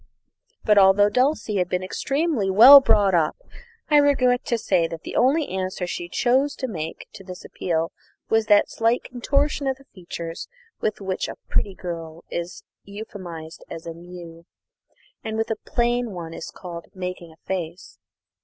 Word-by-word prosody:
But 210 Hz, -1 st, +6 dB
although 195 Hz, +1 st, +6 dB
Dulcie 255 Hz, -5 st, +1 dB
had 180 Hz, -1 st, 0 dB
been 180 Hz, 0 st, -1 dB
extremely 270 Hz, -, -1 dB
well 250 Hz, +9 st, +10 dB
brought 210 Hz, -6 st, +3 dB
up, 165 Hz, -3 st, +2 dB, 0.5 s
I 295 Hz, -, +7 dB
regret 260 Hz, -4 st, +3 dB
to 235 Hz, -, 0 dB
say 180 Hz, -6 st, +1 dB
that 165 Hz, -1 st, -8 dB
the -, -, -7 dB
only 285 Hz, +5 st, +3 dB
answer 185 Hz, -1 st, -3 dB
she 175 Hz, 0 st, -5 dB
chose 260 Hz, +9 st, +1 dB
to 260 Hz, -, -4 dB
make 165 Hz, -7 st, -6 dB
to 205 Hz, -2 st, -11 dB
this 180 Hz, -1 st, -10 dB
appeal 165 Hz, -1 st, -2 dB, 0.4 s
was 225 Hz, -1 st, +2 dB
that 205 Hz, -1 st, +5 dB
slight 230 Hz, +2 st, +1 dB
contortion 280 Hz, +3 st, -1 dB
of 265 Hz, -1 st, 0 dB
the 275 Hz, -, -20 dB
features, 170 Hz, -3 st, -7 dB, 0.3 s
which 215 Hz, -, -2 dB
with 190 Hz, -2 st, -3 dB
a -, -, -7 dB
pretty 195 Hz, -2 st, -1 dB
girl 165 Hz, -2 st, -7 dB
is 170 Hz, +1 st, -5 dB, 0.2 s
euphemised 185 Hz, -6 st, -9 dB
as 165 Hz, 0 st, -8 dB
a 165 Hz, -, -5 dB
"moue," 170 Hz, -1 st, -11 dB, 0.8 s
and 220 Hz, -1 st, -4 dB
with 225 Hz, 0 st, -1 dB
a -, -, +1 dB
plain 240 Hz, 0 st, +1 dB
one 165 Hz, -2 st, -7 dB
is 165 Hz, -, -7 dB
called 170 Hz, -2 st, -9 dB
"making 180 Hz, -2 st, -6 dB
a 160 Hz, -, -19 dB
face." 180 Hz, -2 st, -5 dB
195 Hz, 165 wpm, -23 LUFS, 175-240 Hz, 0.8 s, well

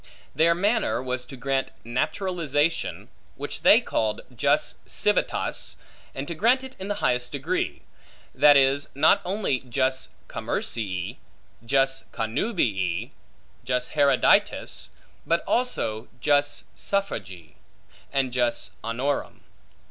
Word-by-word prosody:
Their 170 Hz, +1 st, +4 dB
manner 210 Hz, +6 st, +1 dB
was 125 Hz, 0 st, -3 dB
to 135 Hz, +1 st, -10 dB
grant 135 Hz, +1 st, -1 dB
naturalization 155 Hz, -, -1 dB, 0.3 s
(which -, -, -6 dB
they -, -, +7 dB
called 110 Hz, -1 st, -1 dB
jus -, -, +1 dB
civitatis), -, -, 0 dB, 0.4 s
and 135 Hz, +1 st, -4 dB
to 170 Hz, -, -3 dB
grant 240 Hz, +10 st, +3 dB
it 265 Hz, 0 st, -9 dB
in 190 Hz, -, -5 dB
the 205 Hz, -, -1 dB
highest 125 Hz, 0 st, +1 dB
degree; 155 Hz, +6 st, -2 dB, 0.5 s
that 145 Hz, -1 st, +7 dB
is, 135 Hz, +1 st, +3 dB
not 150 Hz, +3 st, +5 dB
only 185 Hz, -8 st, 0 dB
jus 130 Hz, +1 st, -1 dB, 0.2 s
commercii, 100 Hz, 0 st, -3 dB, 0.5 s
jus 135 Hz, +2 st, +1 dB
connubii, 110 Hz, -, -1 dB, 0.5 s
jus 125 Hz, +1 st, -1 dB
haereditatis; 140 Hz, -3 st, +2 dB, 0.4 s
but 170 Hz, +1 st, +2 dB
also 120 Hz, -, 0 dB
jus 145 Hz, +2 st, +2 dB
suffragii, 95 Hz, -, -3 dB, 0.6 s
and 135 Hz, -3 st, 0 dB
jus 120 Hz, -2 st, 0 dB
honorum. 125 Hz, +5 st, -2 dB
135 Hz, 110 wpm, -25 LUFS, 125-165 Hz, 0.6 s, they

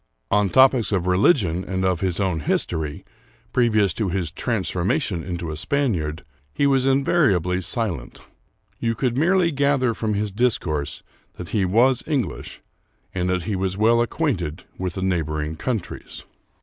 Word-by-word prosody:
On 105 Hz, -1 st, +3 dB
topics 130 Hz, 0 st, +4 dB
of 95 Hz, -4 st, 0 dB
religion 90 Hz, -, +3 dB
and 95 Hz, 0 st, -2 dB
of 90 Hz, -3 st, +1 dB
his 95 Hz, -2 st, -1 dB
own 95 Hz, -5 st, 0 dB
history, 75 Hz, 0 st, -2 dB, 0.5 s
previous 110 Hz, -6 st, +3 dB
to 105 Hz, -4 st, -1 dB
his 90 Hz, -4 st, -2 dB
transformation 95 Hz, -, -1 dB
into 85 Hz, -2 st, -4 dB
a -, -, -4 dB
Spaniard, 85 Hz, -, -1 dB, 0.3 s
he 140 Hz, -, 0 dB
was 135 Hz, -1 st, +3 dB
invariably 130 Hz, -, +2 dB
silent. 90 Hz, -, -3 dB, 0.6 s
You 115 Hz, 0 st, 0 dB
could 120 Hz, +1 st, -1 dB
merely 170 Hz, +4 st, +3 dB
gather 140 Hz, -4 st, +2 dB
from 110 Hz, -2 st, -2 dB
his 105 Hz, 0 st, -1 dB
disccurse 90 Hz, -, -1 dB, 0.3 s
that 90 Hz, -2 st, -8 dB
he 100 Hz, 0 st, +1 dB
was 120 Hz, +7 st, +3 dB
English, 130 Hz, -, -3 dB, 0.5 s
and 90 Hz, -1 st, -1 dB
that 90 Hz, -1 st, 0 dB
he 100 Hz, +3 st, -2 dB
was 95 Hz, 0 st, -2 dB
well 115 Hz, +2 st, +4 dB
acquainted 95 Hz, -, -2 dB
with 90 Hz, -2 st, -4 dB
the 95 Hz, -, -3 dB
neighbor 80 Hz, -5 st, -1 dB
ing 75 Hz, +1 st, -3 dB
countries. 115 Hz, -3 st, -5 dB
95 Hz, 150 wpm, -23 LUFS, 90-125 Hz, 0.6 s, topics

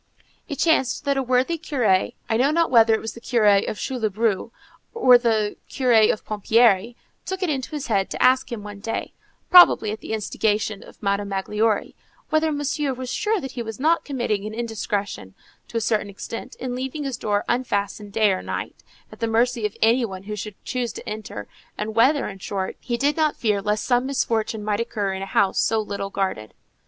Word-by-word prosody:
It 290 Hz, -, -3 dB
chanced 305 Hz, -3 st, +1 dB
that 280 Hz, 0 st, +2 dB
a 270 Hz, -, +1 dB
worthy 260 Hz, +6 st, +1 dB
curé, 245 Hz, -12 st, +1 dB
I 225 Hz, -, 0 dB
know 255 Hz, +5 st, +3 dB
not 330 Hz, 0 st, +1 dB
whether 225 Hz, -2 st, +6 dB
it -, -, -2 dB
was 225 Hz, -, -5 dB
the 235 Hz, -, -12 dB
curé 210 Hz, -5 st, +3 dB
of -, -, -5 dB
Couloubroux 220 Hz, -4 st, -1 dB, 0.5 s
or 250 Hz, -, +6 dB
the 220 Hz, -3 st, 0 dB
curé 235 Hz, -5 st, +4 dB
of 215 Hz, -, -6 dB
Pompierry, 220 Hz, +1 st, +3 dB, 0.3 s
took 380 Hz, 0 st, -4 dB
it 345 Hz, -, +1 dB
into 265 Hz, -3 st, -3 dB
his 300 Hz, -3 st, -5 dB
head 195 Hz, -4 st, 0 dB
to -, -, -5 dB
ask 260 Hz, +1 st, +4 dB
him 225 Hz, -3 st, -5 dB
one 205 Hz, -1 st, -8 dB
day, 225 Hz, +3 st, -4 dB, 0.4 s
probably 350 Hz, -12 st, +7 dB
at 215 Hz, -, -5 dB
the -, -, -6 dB
instigation 215 Hz, -1 st, -1 dB
of -, -, -16 dB
Madame 200 Hz, 0 st, 0 dB
Magloire, 210 Hz, +2 st, 0 dB, 0.4 s
whether 315 Hz, 0 st, +2 dB
Monsieur 290 Hz, -1 st, -1 dB
was 255 Hz, 0 st, -5 dB
sure 430 Hz, 0 st, 0 dB
that 270 Hz, -4 st, -6 dB
he 245 Hz, -, -5 dB
was 225 Hz, -1 st, -6 dB
not 320 Hz, +4 st, +2 dB
committing 240 Hz, -8 st, -2 dB
an 215 Hz, -, -7 dB
indiscretion, 205 Hz, -, -4 dB, 0.3 s
to 230 Hz, -, -4 dB
a -, -, 0 dB
certain 215 Hz, -2 st, 0 dB
extent, 205 Hz, +3 st, -7 dB
in 255 Hz, -1 st, -5 dB
leaving 265 Hz, +4 st, -4 dB
his 270 Hz, -3 st, -3 dB
door 205 Hz, -1 st, -1 dB
unfastened 205 Hz, -4 st, -2 dB
day 215 Hz, -1 st, +3 dB
and 185 Hz, -, -3 dB
night, -, -, -5 dB, 0.3 s
at -, -, -13 dB
the 230 Hz, -, 0 dB
mercy 230 Hz, 0 st, +1 dB
of 210 Hz, -, -15 dB
any 235 Hz, +3 st, +4 dB
one 190 Hz, -4 st, -5 dB
who 210 Hz, +1 st, -5 dB
should 210 Hz, 0 st, -6 dB
choose 245 Hz, -2 st, -2 dB
to -, -, -9 dB
enter, 210 Hz, -, -6 dB, 0.3 s
and 215 Hz, +1 st, -3 dB
whether, 265 Hz, +6 st, +3 dB
in 195 Hz, -1 st, -8 dB
short, 190 Hz, 0 st, -4 dB
he 240 Hz, -2 st, -3 dB
did 285 Hz, +3 st, +1 dB
not 310 Hz, -2 st, +1 dB
fear 210 Hz, -3 st, +1 dB
lest 210 Hz, +1 st, -1 dB
some 245 Hz, 0 st, +2 dB
misfortune 225 Hz, -5 st, -1 dB
might 210 Hz, 0 st, -1 dB
occur 210 Hz, -4 st, -2 dB
in 190 Hz, -, -5 dB
a 195 Hz, -, -4 dB
house 195 Hz, -1 st, +2 dB
so 225 Hz, -, +2 dB
little 200 Hz, -2 st, -4 dB
guarded. 190 Hz, -, -3 dB
225 Hz, 205 wpm, -23 LUFS, 205-255 Hz, 0.5 s, probably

